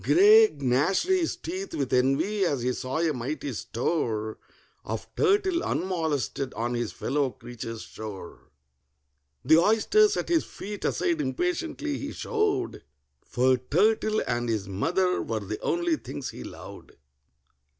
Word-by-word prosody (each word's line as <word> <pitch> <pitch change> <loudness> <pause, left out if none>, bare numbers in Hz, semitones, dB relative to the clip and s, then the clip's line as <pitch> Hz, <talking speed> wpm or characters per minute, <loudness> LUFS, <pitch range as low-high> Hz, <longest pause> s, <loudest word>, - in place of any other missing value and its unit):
GRAY 425 +3 +6
gnashed 135 - +2
his 370 -3 +1
teeth 375 +3 -5
with 135 -3 -2
envy 135 +11 +2
as 140 -9 0
he 125 +1 +1
saw 130 +3 -3
a 165 -1 +1
mighty 135 +2 -4
store 110 -3 -2 0.4
Of - - -5
turtle 395 -4 +2
unmolested 160 -7 -2
on 120 +2 -2
his 120 0 -2
fellow 140 0 -1
creature's 115 -2 -8
shore. 100 -5 -9 1.0
The 160 - +7
oysters 390 - +4
at - - -3
his 335 -2 +3
feet 205 0 -7
aside 335 -4 0
impatiently 325 0 -2
he 285 +1 -5
shoved, 420 -4 -1 0.4
For 130 +1 +2
turtle 215 - +2
and 120 0 -1
his 105 -4 -1
mother 180 - 0
were 110 -1 -3
the 105 +2 -5
only 345 -2 +1
things 140 - -6
he - - -9
loved. - - -11
165 Hz, 135 wpm, -27 LUFS, -, 1.0 s, The